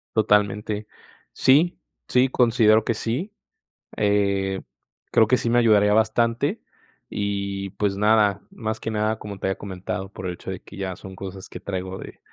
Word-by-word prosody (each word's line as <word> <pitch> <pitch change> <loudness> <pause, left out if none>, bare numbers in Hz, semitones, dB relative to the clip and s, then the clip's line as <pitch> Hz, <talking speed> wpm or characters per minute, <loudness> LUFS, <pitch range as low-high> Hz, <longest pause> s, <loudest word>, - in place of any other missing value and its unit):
Totalmente, 105 0 +1 0.5
sí 150 +7 +4 0.3
sí, 125 +1 +4
considero 115 -3 +4
que 115 - 0
sí, 130 - -3 0.7
eh, 100 -2 +1 0.5
creo 110 - +5
que 125 +4 +3
sí 115 - -1
me 120 - +3
ayudaría 105 -3 +5
bastante 115 +1 +1 0.5
y 100 -1 -3
pues 100 -1 -1
nada, 105 -2 +3
más 110 0 -4
que 115 - -4
nada, 110 +1 0
como 100 -3 -8
te - - -2
había 95 - -1
comentado, 95 0 -5
por 95 - -6
el 90 - -2
hecho 95 - -7
de 95 - -5
que - - -13
ya 95 -2 -3
son 95 0 -11
cosas 95 0 -8
que - - -8
traigo 95 -1 -4
de, - - -10
105 Hz, 165 wpm, -24 LUFS, 95-110 Hz, 0.7 s, creo